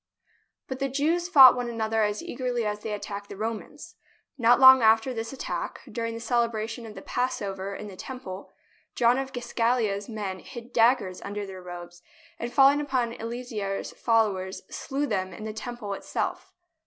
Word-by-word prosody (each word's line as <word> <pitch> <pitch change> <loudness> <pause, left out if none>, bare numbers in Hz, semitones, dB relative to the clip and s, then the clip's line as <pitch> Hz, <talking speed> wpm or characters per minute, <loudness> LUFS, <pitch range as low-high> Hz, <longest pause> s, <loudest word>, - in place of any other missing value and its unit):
But 260 0 -5
the 275 - 0
Jews 325 +6 0
fought 265 -8 +9
one 245 -1 -3
another 225 -1 0
as 210 +6 0
eagerly 250 -8 -2
as 210 0 -2
they 215 +1 -5
attacked 205 -1 -5
the - - -8
Romans. 220 +1 -6 0.4
Not 245 -2 +4
long 260 -1 +9
after 225 +3 +4
this 225 -1 -4
at 270 - -8
tack, - - -4
during 230 -1 -3
the - - -5
celebration 230 -1 -1
of 215 - -10
the - - -9
Passover 200 -6 -2
in 210 - -7
the 195 - -9
Temple, 200 -4 -8 0.4
John 245 +2 +4
of 270 0 -4
Giscala's 235 -4 0
men 205 -4 -4
hid 240 +4 -10
daggers 225 -6 +3
under 205 0 -5
their 190 -1 -9
robes, 175 -1 -9 0.4
and 240 - -4
falling 275 +2 +5
upon 255 -5 -1
Eleazar's 230 -4 -4
followers 205 -5 0
slew 280 +2 -2
them 190 -7 -2
in 215 - -9
the 215 0 -4
Temple 220 -2 -5
itself. - - -4
230 Hz, 170 wpm, -27 LUFS, 205-250 Hz, 0.4 s, fought